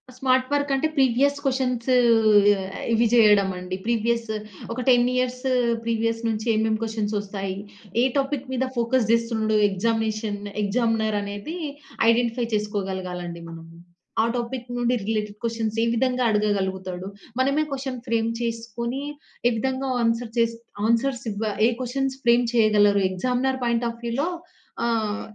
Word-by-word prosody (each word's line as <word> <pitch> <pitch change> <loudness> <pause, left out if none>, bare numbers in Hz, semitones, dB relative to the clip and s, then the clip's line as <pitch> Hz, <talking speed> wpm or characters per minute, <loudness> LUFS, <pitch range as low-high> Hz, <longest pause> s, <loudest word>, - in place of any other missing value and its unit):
Smart 255 0 +2
వర్కంటే 285 0 +1
previous 270 +2 +3
questions 255 -3 0 1.0
ఇవి 230 +1 +3
చేయడం 210 -4 +6
అండి. 180 0 -5
ప్రీవియస్ 235 0 0 0.5
ఒక 250 - -4
10 245 -1 +5
ఇయర్స్ 255 0 -1 0.4
ప్రీవియస్ 230 0 0
నుంచి 220 0 -2
ఏమేం 220 0 +1
క్వెషన్స్ 220 -2 -2
వస్తాయి? 195 -1 -4 0.4
ఏ - - +4
టాపిక్ 275 -1 -1
మీద 260 0 0
ఫోకస్ 235 -1 +1
చేస్తున్నడూ? 230 -2 +1
ఎగ్జామినేషన్ 215 +1 -1 0.2
ఎగ్జామినర్ 220 0 +1
అనేది 205 +10 -6 0.5
ఐడెంటిఫై 235 +1 +2
చేసుకోగలగాలండి 190 -4 -3
మనము. 165 0 -11 0.5
ఆ - - +2
టాపిక్ 240 +1 -4
నుండి 245 0 +1
రిలేటెడ్ 210 0 -2
క్వెషన్స్ 225 -1 -2
ఏ - - +2
విధంగా 255 +1 +1
అడగగలుగుతాడు? 190 -3 -1 0.3
మనమే 275 +4 +2
క్వెషన్ 265 -2 -4
ఫ్రేమ్ 230 0 +1
చేసుకొని 235 +2 -3 0.5
ఏ - - +3
విధంగా 265 +3 -1
ఆన్సర్ 230 0 0
చేసి 230 0 +2 0.3
ఆన్సర్స్ 240 +2 +1
ఇవ 210 +1 -2 0.2
ఏ - - +3
క్వెషన్స్ 265 +2 -1
ఫ్రేమ్ 240 +1 +5
చేయగలరు? 210 -3 +4
ఎగ్జామినర్ 250 +7 0
పాయింట్ 235 0 +1
ఆఫ్ 230 0 -8
వ్యూలో 265 +8 0 0.6
ఆహ్, 220 -2 0
230 Hz, 130 wpm, -24 LUFS, 210-250 Hz, 1.0 s, చేయడం